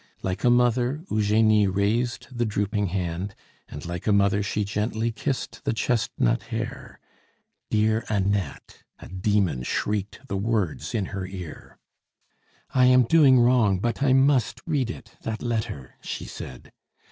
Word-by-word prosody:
Like 95 Hz, +1 st, -3 dB
a 125 Hz, -, +5 dB
mother 125 Hz, +4 st, +2 dB
Eugenie 105 Hz, 0 st, +3 dB
raised 110 Hz, +6 st, -1 dB
the 120 Hz, -, 0 dB
drooping 105 Hz, -1 st, -1 dB
hand, 90 Hz, +1 st, -3 dB, 0.3 s
and 75 Hz, -, -8 dB
like 85 Hz, +3 st, -5 dB
a -, -, +4 dB
mother 100 Hz, 0 st, +3 dB
she 105 Hz, +1 st, -1 dB
gently 110 Hz, +3 st, -1 dB
kissed 115 Hz, -1 st, -4 dB
the -, -, 0 dB
chestnut 110 Hz, -, 0 dB
hair -, -, -6 dB, 0.7 s
"Dear 110 Hz, +1 st, +2 dB
Annette!" 100 Hz, -6 st, -2 dB, 0.2 s
a -, -, -11 dB
demon 95 Hz, -6 st, 0 dB
shrieked 105 Hz, -, -2 dB
the 100 Hz, -, -2 dB
words 105 Hz, -1 st, -1 dB
in 105 Hz, -4 st, 0 dB
her 95 Hz, -2 st, -3 dB
ear. 90 Hz, -4 st, -9 dB, 1.0 s
"I 130 Hz, -1 st, +5 dB
am 130 Hz, 0 st, +6 dB
doing 135 Hz, -1 st, +6 dB
wrong; 120 Hz, -5 st, +4 dB
but 120 Hz, +5 st, -2 dB
I 140 Hz, -2 st, +3 dB
must 135 Hz, -2 st, +3 dB
read 145 Hz, -7 st, 0 dB
it, 115 Hz, 0 st, -9 dB
that 110 Hz, -1 st, -4 dB
letter," 110 Hz, -, -3 dB
she -, -, -5 dB
said. 65 Hz, -1 st, -9 dB
105 Hz, 145 wpm, -25 LUFS, 95-120 Hz, 1.0 s, am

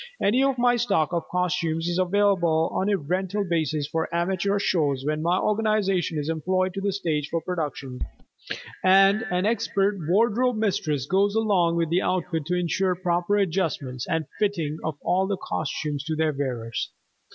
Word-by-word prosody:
Any 235 Hz, +6 st, +3 dB
of 275 Hz, -1 st, +1 dB
my 245 Hz, 0 st, +3 dB
stock 195 Hz, -9 st, +1 dB
of 170 Hz, -, -2 dB
costumes 175 Hz, -2 st, 0 dB
is 175 Hz, +1 st, 0 dB
available 185 Hz, -4 st, +2 dB
on 190 Hz, -, 0 dB
a 200 Hz, -, +2 dB
rental 185 Hz, +5 st, -2 dB
basis 155 Hz, -3 st, 0 dB
for 160 Hz, +2 st, -2 dB
amateur 185 Hz, +3 st, 0 dB
shows 145 Hz, -9 st, 0 dB
when 155 Hz, +1 st, -1 dB
my 170 Hz, +3 st, +2 dB
organization 210 Hz, -6 st, +1 dB
is 145 Hz, 0 st, -2 dB
employed 185 Hz, +4 st, 0 dB
to 195 Hz, +1 st, -1 dB
stage 160 Hz, -7 st, -2 dB
the 165 Hz, -, 0 dB
productions, 150 Hz, -7 st, -4 dB, 0.8 s
and 195 Hz, +3 st, +5 dB
an 180 Hz, +2 st, 0 dB
expert 200 Hz, -3 st, +1 dB
wardrobe 230 Hz, +5 st, +2 dB
mistress 160 Hz, -, 0 dB
goes 200 Hz, +5 st, +2 dB
along 195 Hz, -7 st, +2 dB
with 165 Hz, -1 st, 0 dB
the 180 Hz, +2 st, +3 dB
outfit 170 Hz, -4 st, -1 dB
to 180 Hz, -, 0 dB
insure 180 Hz, +1 st, 0 dB
proper 175 Hz, +2 st, 0 dB
adjustment 160 Hz, -9 st, -1 dB
and 165 Hz, -2 st, 0 dB
fitting 165 Hz, -8 st, -1 dB
of 155 Hz, -3 st, -3 dB
all 190 Hz, +1 st, +1 dB
the 200 Hz, -1 st, -1 dB
costumes 150 Hz, -3 st, -3 dB
to 160 Hz, 0 st, -2 dB
their 155 Hz, -1 st, +1 dB
wearers. 125 Hz, -5 st, -3 dB
180 Hz, 165 wpm, -25 LUFS, 160-200 Hz, 0.8 s, and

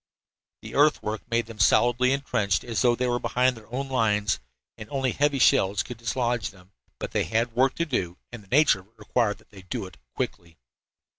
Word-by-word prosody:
The -, -, -9 dB
earthwork 130 Hz, -7 st, +1 dB
made 115 Hz, 0 st, +1 dB
them 115 Hz, -1 st, -11 dB
as 95 Hz, -, +6 dB
solidly 120 Hz, +1 st, +3 dB
entrenched 120 Hz, -8 st, 0 dB
as 115 Hz, -3 st, -2 dB
though 120 Hz, -2 st, +4 dB
they 125 Hz, -, -1 dB
were 120 Hz, 0 st, 0 dB
behind 125 Hz, +1 st, +1 dB
their 115 Hz, 0 st, -15 dB
own 135 Hz, +2 st, -3 dB
lines, 105 Hz, -, +1 dB, 0.4 s
and 110 Hz, -, -10 dB
only 135 Hz, -3 st, 0 dB
heavy 145 Hz, +1 st, +1 dB
shells 105 Hz, -7 st, +3 dB
could 125 Hz, -, -8 dB
dislodge 120 Hz, -2 st, -1 dB
them. 95 Hz, -2 st, -19 dB, 0.3 s
But -, -, -5 dB
they -, -, 0 dB
had 115 Hz, +1 st, 0 dB
work 130 Hz, +3 st, +2 dB
to 170 Hz, -, 0 dB
do, 95 Hz, -, -2 dB
and 120 Hz, -2 st, -8 dB
the -, -, -21 dB
nature 140 Hz, -3 st, +4 dB
of 95 Hz, -, -17 dB
it 110 Hz, -, -35 dB
required 110 Hz, -4 st, 0 dB
that -, -, -25 dB
they 100 Hz, -2 st, -12 dB
do 95 Hz, +1 st, -5 dB
it 95 Hz, -, -13 dB, 0.2 s
quickly. 85 Hz, -1 st, -5 dB
115 Hz, 210 wpm, -26 LUFS, 105-125 Hz, 0.4 s, as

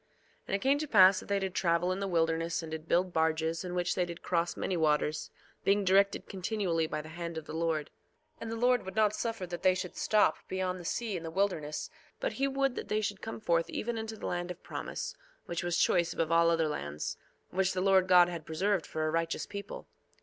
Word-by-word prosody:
2:6 -, -, -40 dB, 0.4 s
And -, -, 0 dB
it 195 Hz, -, -2 dB
came 275 Hz, +2 st, +3 dB
to 310 Hz, -, -3 dB
pass 190 Hz, -5 st, +7 dB
that -, -, -11 dB
they 200 Hz, -, +1 dB
did 190 Hz, -2 st, -2 dB
travel 170 Hz, 0 st, +1 dB
in 185 Hz, -, -2 dB
the 200 Hz, -, -2 dB
wilderness, 165 Hz, -1 st, 0 dB
and 160 Hz, -, -7 dB
did 160 Hz, 0 st, -6 dB
build 180 Hz, +1 st, +2 dB
barges, 160 Hz, +1 st, +1 dB
in 180 Hz, -1 st, -5 dB
which 175 Hz, 0 st, +1 dB
they 180 Hz, -, +1 dB
did 170 Hz, 0 st, -7 dB
cross 170 Hz, -1 st, 0 dB
many 190 Hz, -, -1 dB
waters, 150 Hz, -2 st, +1 dB, 0.3 s
being 200 Hz, 0 st, +3 dB
directed 195 Hz, +2 st, +3 dB
continually 185 Hz, -4 st, -1 dB
by 150 Hz, -1 st, -3 dB
the 155 Hz, -, -10 dB
hand 170 Hz, 0 st, -5 dB
of 160 Hz, -, -5 dB
the -, -, -8 dB
Lord. 160 Hz, -2 st, -1 dB, 0.5 s
2:7 -, -, -30 dB
And 225 Hz, -, -4 dB
the -, -, -2 dB
Lord 245 Hz, +2 st, +3 dB
would 190 Hz, -, -7 dB
not 215 Hz, -1 st, +3 dB
suffer 225 Hz, -3 st, -3 dB
that 175 Hz, -1 st, -6 dB
they 185 Hz, -1 st, +4 dB
should 185 Hz, -1 st, -5 dB
stop 215 Hz, -1 st, +3 dB
beyond 185 Hz, -1 st, -2 dB
the 175 Hz, -, -10 dB
sea 225 Hz, +2 st, -2 dB
in 175 Hz, -, -3 dB
the 165 Hz, -, -5 dB
wilderness, 160 Hz, -5 st, -1 dB, 0.3 s
but -, -, -1 dB
he 275 Hz, -, 0 dB
would 275 Hz, -1 st, +1 dB
that -, -, -6 dB
they 215 Hz, 0 st, 0 dB
should 205 Hz, -2 st, -3 dB
come 225 Hz, -, -6 dB
forth 170 Hz, -5 st, +1 dB
even 235 Hz, +1 st, -3 dB
unto 220 Hz, 0 st, -5 dB
the -, -, -7 dB
land 175 Hz, 0 st, -2 dB
of 180 Hz, -, -8 dB
promise, -, -, -5 dB, 0.3 s
which 170 Hz, +1 st, -3 dB
was 175 Hz, 0 st, 0 dB
choice 170 Hz, -2 st, +3 dB
above 165 Hz, -1 st, -1 dB
all 170 Hz, 0 st, +5 dB
other 165 Hz, -1 st, +2 dB
lands, 75 Hz, -, -4 dB, 0.4 s
which 190 Hz, +1 st, +1 dB
the 185 Hz, -, -1 dB
Lord 190 Hz, 0 st, +4 dB
God 180 Hz, -1 st, +7 dB
had 170 Hz, -2 st, -5 dB
preserved 185 Hz, +4 st, 0 dB
for 155 Hz, 0 st, -2 dB
a 155 Hz, -, 0 dB
righteous 165 Hz, 0 st, -1 dB
people. 200 Hz, 0 st, -7 dB
180 Hz, 240 wpm, -31 LUFS, 165-200 Hz, 0.5 s, pass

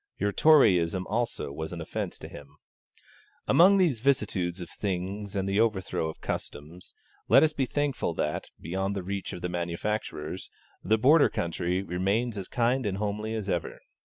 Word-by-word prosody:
Your 100 Hz, -, 0 dB
Toryism 95 Hz, -, +4 dB
also 115 Hz, -9 st, -2 dB
was 80 Hz, +2 st, -5 dB
an 85 Hz, -, -6 dB
offence 80 Hz, -, -4 dB
to -, -, -9 dB
him. 75 Hz, 0 st, -12 dB, 0.9 s
Among 190 Hz, +4 st, +6 dB
these 165 Hz, -, +2 dB
vicissitudes 100 Hz, -9 st, 0 dB
of 90 Hz, -, -6 dB
things 100 Hz, +1 st, -4 dB
and 95 Hz, -1 st, -1 dB
the 100 Hz, +1 st, +1 dB
overthrow 95 Hz, -7 st, 0 dB
of 80 Hz, -, -10 dB
customs, 80 Hz, +5 st, -6 dB, 0.3 s
let -, -, +7 dB
us 155 Hz, -1 st, +3 dB
be 135 Hz, -3 st, -1 dB
thankful 140 Hz, -, -1 dB
that, 75 Hz, -1 st, -2 dB
beyond 95 Hz, +4 st, -2 dB
the 95 Hz, -, -3 dB
reach 100 Hz, +1 st, -4 dB
of 90 Hz, -, -8 dB
the 90 Hz, -, -1 dB
manufacturers, 85 Hz, -1 st, -3 dB, 0.3 s
the 110 Hz, +4 st, +3 dB
Border 145 Hz, +7 st, +5 dB
country 85 Hz, +2 st, -2 dB
remains 100 Hz, +6 st, -1 dB
as 95 Hz, -2 st, -5 dB
kind 125 Hz, 0 st, +1 dB
and 95 Hz, -1 st, -2 dB
homely 105 Hz, +2 st, -2 dB
as 105 Hz, -3 st, -4 dB
ever. 90 Hz, -4 st, -2 dB
100 Hz, 165 wpm, -28 LUFS, 90-115 Hz, 0.9 s, let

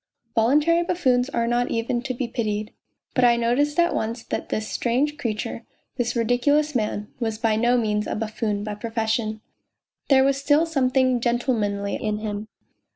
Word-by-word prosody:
Voluntary 295 Hz, +9 st, +3 dB
buffoons 270 Hz, -8 st, +1 dB
are 235 Hz, -3 st, 0 dB
not 240 Hz, +1 st, +1 dB
even 235 Hz, +1 st, -1 dB
to 255 Hz, 0 st, -4 dB
be 245 Hz, 0 st, -2 dB
pitied. 215 Hz, -3 st, -3 dB, 0.4 s
But 255 Hz, -, +2 dB
I 240 Hz, -1 st, +6 dB
noticed 245 Hz, +6 st, +1 dB
at 345 Hz, 0 st, +3 dB
once 225 Hz, +2 st, -2 dB
that -, -, -4 dB
this 215 Hz, 0 st, -2 dB
strange 265 Hz, +5 st, 0 dB
creature, 230 Hz, -3 st, -4 dB, 0.3 s
this 245 Hz, -1 st, -1 dB
ridiculous 285 Hz, +6 st, +2 dB
man, 210 Hz, -3 st, -2 dB
was 225 Hz, -3 st, -2 dB
by 225 Hz, -1 st, +1 dB
no 240 Hz, +3 st, +3 dB
means 210 Hz, -2 st, 0 dB
a -, -, -2 dB
buffoon 215 Hz, -1 st, -2 dB
by 210 Hz, 0 st, -4 dB
profession. 220 Hz, 0 st, -2 dB, 0.7 s
There 265 Hz, -2 st, +6 dB
was 275 Hz, 0 st, +2 dB
still 290 Hz, +3 st, +3 dB
something 260 Hz, -4 st, +2 dB
gentlemanly 225 Hz, -5 st, 0 dB
in 215 Hz, -1 st, -2 dB
him. 210 Hz, 0 st, -4 dB
235 Hz, 160 wpm, -24 LUFS, 220-265 Hz, 0.7 s, I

